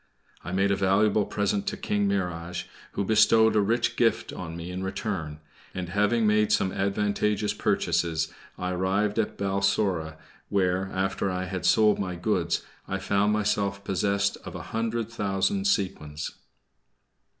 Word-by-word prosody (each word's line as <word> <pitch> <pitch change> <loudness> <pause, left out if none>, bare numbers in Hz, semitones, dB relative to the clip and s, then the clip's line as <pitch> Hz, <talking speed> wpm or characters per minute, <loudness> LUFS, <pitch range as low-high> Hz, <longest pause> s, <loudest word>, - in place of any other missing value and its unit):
I 90 - -6
made 95 +2 +2
a - - +3
valuable 100 +2 +3
present 100 -1 -1
to - - -2
King 105 -1 0
Mihrage, 90 -3 -2 0.3
who - - -1
bestowed 110 +1 +5
a 105 - +5
rich 115 +4 +1
gift 115 -2 +1
on 85 -2 -6
me 85 +1 -6
in 90 +1 -4
return; 95 -6 -3 0.4
and, 90 -2 -4
having 105 +4 +2
made 105 0 +3
some 95 -2 +2
advantageous 105 +1 0
purchases, 80 -1 0 0.2
I 90 0 -2
arrived 100 +4 0
at 110 - -1
Balsora, 95 -4 0 0.3
where, 95 -1 +1
after 95 +1 -1
I 90 0 -2
had 90 -1 -2
sold 105 +2 +4
my 95 -3 -2
goods, 85 - 0 0.2
I 95 - -2
found 100 +2 +1
myself 100 -2 0
possessed 100 +1 0
of - - -10
a - - -6
hundred 115 0 -1
thousand 105 - 0
sequins. 75 - -1
100 Hz, 150 wpm, -27 LUFS, 90-105 Hz, 0.4 s, bestowed